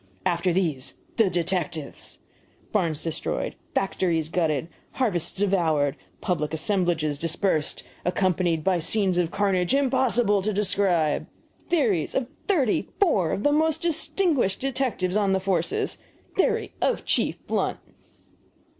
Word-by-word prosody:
AFTER 175 +1 +1
THESE, 165 -8 0 0.2
THE 220 -4 +4
DETECTIVES! 175 -3 -3 0.5
BARNS 165 -7 0
DESTROYED, 165 -2 -2 0.2
FACTORIES 170 -5 0
GUTTED, 160 -3 0 0.3
HARVESTS 210 -11 0
DEVOURED, 165 -8 +1 0.3
PUBLIC 160 -3 -1
ASSEMBLAGES 160 -4 0
DISPERSED, 165 -1 0 0.2
ACCOMPANIED 180 -3 +1
BY 185 0 +2
SCENES 190 +1 +1
OF 170 -2 +1
CARNAGE 195 +3 +1
IMPOSSIBLE 250 -6 +2
TO 210 +2 -1
DESCRIBE! 190 -6 +1 0.4
THEORIES 230 - +1
OF 265 - +1 0.2
THIRTY 290 - +1
FOUR 210 - +3
OF 200 - -2
THE 290 - +4
MOST 320 +2 +2
DISTINGUISHED 320 - +1
DETECTIVES 250 -9 -1
ON 200 -2 +2
THE 190 - +2
FORCE! 185 -3 -1 0.4
THEORY 385 - +1
OF - - 0
CHIEF - - +1
BLUNT! - - -1
185 Hz, 120 wpm, -25 LUFS, 165-220 Hz, 0.5 s, THE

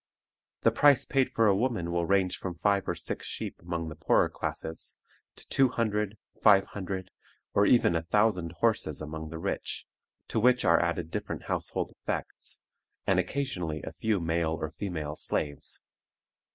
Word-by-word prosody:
The - - +4
price 145 -3 +5
paid 135 -2 +2
for 115 - +3
a 100 -2 +5
woman 105 -6 0
will 85 -1 0
range 95 -2 +2
from 90 -2 -4
five 100 +3 +1
or - - 0
six - - -4
sheep - - -4
among 85 -1 -3
the 80 - -6
poorer 80 - +3
classes, 80 0 -5 0.4
to - - -16
two 135 -1 +4
hundred, 105 -3 -1 0.2
five 100 -2 +6
hundred, 95 -1 -5 0.4
or 100 0 +4
even 120 -8 +5
a 80 - +1
thousand 90 -1 +1
horses 95 -8 0
among 80 +1 -6
the 80 - -6
rich, 80 - -3 0.4
to - - 0
which 125 +2 +4
are 85 -1 +5
added 85 -1 -1
different - - -4
household - - -2
effects, - - -5 0.5
and 95 -1 +3
occasionally 90 - -2
a - - -5
few 105 +4 0
male 80 -1 0
or 80 - -3
female 80 -7 -4
slaves. 70 -2 -2
90 Hz, 165 wpm, -29 LUFS, 80-105 Hz, 0.5 s, five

